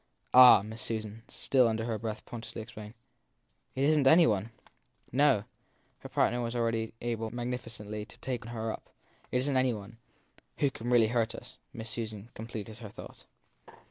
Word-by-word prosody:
Ah, 125 Hz, -5 st, +10 dB
Miss 110 Hz, +2 st, -8 dB
Susan, 110 Hz, -1 st, -4 dB
still 130 Hz, -3 st, +2 dB
under 110 Hz, 0 st, -1 dB
her 115 Hz, -2 st, -2 dB
breath, 110 Hz, -1 st, -5 dB
portentously 115 Hz, -2 st, -7 dB
exclaimed, 110 Hz, -1 st, -10 dB, 0.8 s
it 135 Hz, -, 0 dB
isn 150 Hz, 0 st, +4 dB
t 135 Hz, -, +6 dB
any 165 Hz, +3 st, +7 dB
one! 105 Hz, 0 st, +1 dB, 0.6 s
No 130 Hz, -6 st, +4 dB, 0.6 s
her -, -, -9 dB
partner 120 Hz, +1 st, +1 dB
was 120 Hz, 0 st, -3 dB
already 115 Hz, -1 st, -1 dB
able 115 Hz, -2 st, -2 dB
magnificently 115 Hz, -3 st, -5 dB
to -, -, -16 dB
take 125 Hz, -2 st, -4 dB
her 115 Hz, -1 st, -3 dB
up. -, -, -9 dB, 0.4 s
It -, -, +2 dB
isn 135 Hz, +3 st, 0 dB
t 130 Hz, -, +3 dB
any 130 Hz, -2 st, +2 dB
one 105 Hz, +2 st, -10 dB, 0.6 s
Who 140 Hz, -2 st, +2 dB
can 120 Hz, -1 st, -5 dB
really 120 Hz, -3 st, +5 dB
hurt 115 Hz, -1 st, 0 dB
us -, -, -11 dB
Miss 115 Hz, 0 st, -7 dB
Susan 110 Hz, -1 st, -5 dB
completed 110 Hz, -1 st, -7 dB
her 110 Hz, -3 st, -8 dB
thought. 105 Hz, -, -12 dB
115 Hz, 175 wpm, -30 LUFS, 110-125 Hz, 0.8 s, Ah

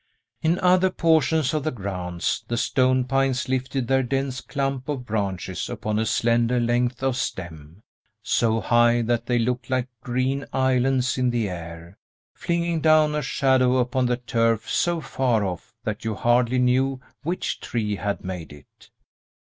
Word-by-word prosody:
In 165 Hz, +2 st, +2 dB
other 185 Hz, +1 st, +4 dB
portions 160 Hz, -3 st, +2 dB
of 155 Hz, -2 st, -1 dB
the 155 Hz, -, 0 dB
grounds 90 Hz, -, -3 dB
the 120 Hz, -, -2 dB
stone 130 Hz, +1 st, +2 dB
pines 135 Hz, -1 st, 0 dB
lifted 130 Hz, -1 st, -1 dB
their 135 Hz, +1 st, +3 dB
dense 135 Hz, +1 st, -2 dB
clump 135 Hz, -1 st, -3 dB
of 135 Hz, -4 st, -3 dB
branches 100 Hz, -5 st, -3 dB
upon 110 Hz, 0 st, -2 dB
a 110 Hz, -, 0 dB
slender 115 Hz, +2 st, +2 dB
length 120 Hz, +2 st, 0 dB
of 135 Hz, -2 st, +1 dB
stem, 85 Hz, -5 st, -6 dB, 0.4 s
so 115 Hz, -1 st, +1 dB
high 120 Hz, 0 st, +3 dB
that 120 Hz, 0 st, -1 dB
they 120 Hz, -, +2 dB
looked 125 Hz, +2 st, -1 dB
like 130 Hz, -1 st, 0 dB
green 130 Hz, +3 st, -1 dB
islands 130 Hz, 0 st, +1 dB
in 125 Hz, -1 st, +2 dB
the 120 Hz, -3 st, 0 dB
air, 85 Hz, 0 st, -8 dB, 0.3 s
flinging 170 Hz, -1 st, -1 dB
down 155 Hz, -1 st, +4 dB
a 150 Hz, -, 0 dB
shadow 130 Hz, -2 st, +2 dB
upon 125 Hz, 0 st, +1 dB
the 120 Hz, 0 st, 0 dB
turf 115 Hz, -2 st, 0 dB
so 175 Hz, -1 st, 0 dB
far 125 Hz, -6 st, 0 dB
off 90 Hz, +3 st, -6 dB
that 105 Hz, -1 st, -4 dB
you 110 Hz, -1 st, -2 dB
hardly 120 Hz, +3 st, +2 dB
knew 130 Hz, +2 st, +2 dB, 0.2 s
which 175 Hz, +4 st, -3 dB
tree 105 Hz, -3 st, -2 dB
had 100 Hz, -1 st, -3 dB
made 90 Hz, -4 st, -6 dB
it. 75 Hz, 0 st, -17 dB
125 Hz, 155 wpm, -24 LUFS, 110-135 Hz, 0.4 s, other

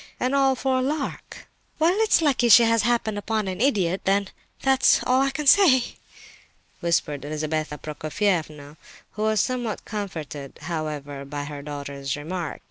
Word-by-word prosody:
—and 255 Hz, +2 st, 0 dB
all 270 Hz, -1 st, +3 dB
for 260 Hz, 0 st, 0 dB
a -, -, 0 dB
lark!" 280 Hz, +2 st, -4 dB, 0.3 s
"Well, 325 Hz, +3 st, +3 dB
it's 440 Hz, -6 st, +3 dB
lucky 265 Hz, -5 st, +2 dB
she 235 Hz, +2 st, +9 dB
has 230 Hz, -1 st, +3 dB
happened 225 Hz, -2 st, 0 dB
upon 215 Hz, -1 st, -2 dB
an 185 Hz, +2 st, -4 dB
idiot, 195 Hz, -9 st, +1 dB
then, 195 Hz, 0 st, +1 dB, 0.3 s
that's 270 Hz, 0 st, +4 dB
all 255 Hz, +1 st, +2 dB
I 275 Hz, -, +2 dB
can 290 Hz, +2 st, -4 dB
say!" 275 Hz, -6 st, +5 dB, 0.8 s
whispered 170 Hz, -4 st, 0 dB
Lizabetha 155 Hz, +1 st, -3 dB
Prokofievna, 155 Hz, -1 st, -3 dB, 0.3 s
who 210 Hz, -, -7 dB
was 215 Hz, -1 st, +2 dB
somewhat 245 Hz, -4 st, -3 dB
comforted, 160 Hz, -9 st, -6 dB
however, 150 Hz, -4 st, -5 dB
by 145 Hz, +1 st, -5 dB
her 145 Hz, 0 st, -7 dB
daughter's 140 Hz, -1 st, -5 dB
remark. 165 Hz, +2 st, -5 dB
195 Hz, 150 wpm, -24 LUFS, -, 0.8 s, she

